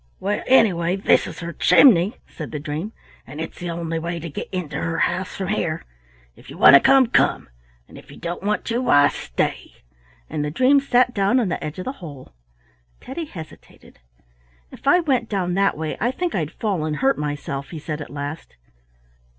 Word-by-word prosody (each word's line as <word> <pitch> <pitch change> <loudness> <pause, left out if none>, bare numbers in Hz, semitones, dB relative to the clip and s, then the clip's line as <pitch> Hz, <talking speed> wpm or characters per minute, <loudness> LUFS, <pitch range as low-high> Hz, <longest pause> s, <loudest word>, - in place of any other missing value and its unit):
"Well, 205 +2 -1
anyway, 185 -9 +3
this 195 - +2
is - - -9
her 170 0 -5
chimney," 205 - +5
said 155 - -8
the 150 - -4
dream, 155 +7 -5 0.4
"and 150 +3 -9
it's 160 - -6
the 175 - -5
only 165 -1 -3
way 170 +1 -4
to 165 -1 -7
get - - -6
into 180 -5 -4
her 165 0 -2
house 180 +2 -1
from 190 -1 -4
here. 165 -6 -2 0.5
If - - -17
you - - -10
want - - +8
to 140 - +10
come, 270 - +5
come; 230 - +1 0.4
and - - -13
if - - -18
you - - -12
don't 175 +1 -5
want 210 +2 -1
to, 230 +1 -1
why, 145 - +5
stay," - - -3 0.5
and 150 - -3
the 150 - -2
dream 260 - +4
sat 250 -2 +2
down 200 +5 +2
on 225 -6 0
the - - -3
edge 155 +2 -6
of 185 - -6
the 260 - -2
hole. 145 - -10 0.7
Teddy 295 +6 -6
hesitated. 165 - -13 0.7
"If - - -11
I 360 +5 +5
went 260 -8 0
down 185 -4 -1
that 195 -1 +1
way, 155 0 -4
I 235 - +2
think 345 +6 -3
I'd 155 -5 -1
fall 195 -6 -2
and 155 -1 -2
hurt 270 - +1
myself," 145 -2 -4
he 165 - -7
said 150 0 -5
at - - -8
last. 145 - -7
175 Hz, 200 wpm, -22 LUFS, 155-225 Hz, 0.7 s, to